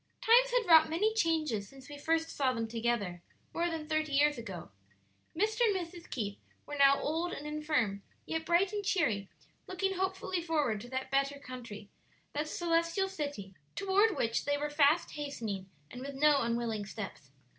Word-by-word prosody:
Time - - +5
had - - +2
wrought 320 -2 +7
many 410 +7 +1
changes 315 - 0
since 270 -1 -14
we 290 - -8
first 325 +3 0
saw 270 -3 +1
them 230 -2 -2
together, 225 -6 -1 0.3
more 340 +1 0
than 320 -2 -4
thirty 310 -1 -1
years 295 +1 +4
ago. 190 - -8 0.7
Mr. 435 +4 +1
and 440 -4 +4
Mrs. 345 -1 -6
Keith 205 -4 -4 0.3
were - - -8
now 275 -1 +6
old 330 +4 -1
and 290 - -6
infirm, 300 -10 -1 0.2
yet 320 0 -2
bright 345 +4 +2
and 410 -1 -2
cheery, 235 - +1 0.4
looking 385 +1 -1
hopefully 375 -1 -2
forward 295 -10 0
to 245 - -10
that 260 +1 -4
better 275 +1 +1
country, 245 -6 -9 0.5
that 300 +1 -2
Celestial 335 +3 +1
City, 285 - -5 0.2
toward 395 +2 +3
which 230 0 0
they 285 0 +1
were 295 +1 -3
fast 295 +2 +3
hastening, 225 -10 -5 0.2
and 250 - -8
with 275 +1 -6
no 290 0 +4
unwilling 230 -3 -1
steps. 195 -11 -7
295 Hz, 170 wpm, -32 LUFS, 235-340 Hz, 0.7 s, wrought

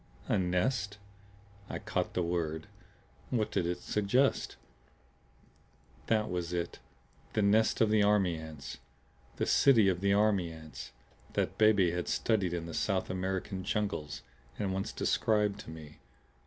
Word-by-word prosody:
"A - - +2
nest?" 105 +4 0 0.7
I - - -3
caught - - -2
the 90 - +1
word. 80 -2 -2 0.6
What 115 -4 0
did 90 -4 0
it 90 - -2
suggest? 115 +7 +1 1.5
That 110 -1 +2
was 90 -1 -3
it 85 -1 -3 0.5
the 105 - +2
nest 110 +2 +3
of 110 -1 +4
the 110 -1 +4
army 100 -4 +3
ants, 80 -3 -8 0.6
the - - -1
city 115 -8 +5
of 90 -1 -1
the 100 0 +2
army 100 -4 +3
ants, 80 -4 -9 0.4
that - - -1
Beebe 105 -5 +5
had 90 0 -3
studied 100 -6 +1
in 85 -1 -3
the 85 - -7
South 95 +3 0
American 95 +1 -3
jungles 100 -7 -2 0.3
and 100 -3 -1
once 95 +1 -2
described 105 -2 +1
to - - -9
me. 80 -2 -10
95 Hz, 140 wpm, -31 LUFS, 85-105 Hz, 1.5 s, city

